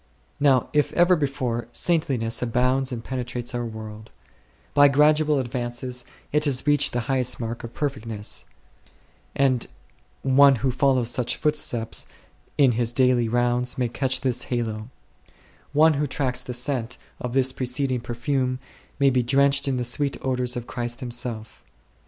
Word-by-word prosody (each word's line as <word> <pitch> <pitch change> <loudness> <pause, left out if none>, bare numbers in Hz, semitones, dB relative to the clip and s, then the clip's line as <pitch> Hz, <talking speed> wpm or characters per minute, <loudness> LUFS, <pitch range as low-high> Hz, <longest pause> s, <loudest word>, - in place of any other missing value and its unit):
Now, 135 -4 +3
if 150 -1 +2
ever 175 +1 +5
before, 135 -6 -2
saintliness 130 -10 0
abounds 125 +2 +1
and 115 -2 -5
penetrates 125 -1 -4
our 120 0 -2
world; 110 -1 -9 0.6
by 145 0 +7
gradual 150 +1 +3
advances 125 -1 -4 0.3
it 150 +1 +2
has 135 -3 0
reached 145 -2 +3
the 120 - 0
highest 130 +1 0
mark 115 0 -5
of 115 0 -8
perfectness; 115 -7 -3 0.9
and 130 -3 +1 0.6
one 135 +1 +6
who 130 - +3
follows 130 -2 +2
such 125 -2 -1
footsteps 125 -7 -1 0.5
in 135 -3 +5
his 120 0 0
daily 125 -2 +3
rounds 120 +1 +1
may 125 -2 0
catch 130 +2 -1
this 125 -2 0
halo; 115 -2 -3 0.8
one 155 +2 +5
who 145 0 -1
tracks 130 -2 -2
the 125 - -7
scent 125 -1 -2 0.2
of 125 -1 -4
this 130 -1 +3
preceding 130 0 -1
perfume 130 +2 -1 0.4
may 140 -1 +4
be 125 -1 +2
drenched 140 +3 +2
in 135 -2 0
the 125 - -1
sweet 135 +4 -1
odours 125 -1 -1
of 120 - -5
Christ 120 +1 -4
Himself. 120 -2 -5
125 Hz, 145 wpm, -24 LUFS, 120-140 Hz, 0.9 s, by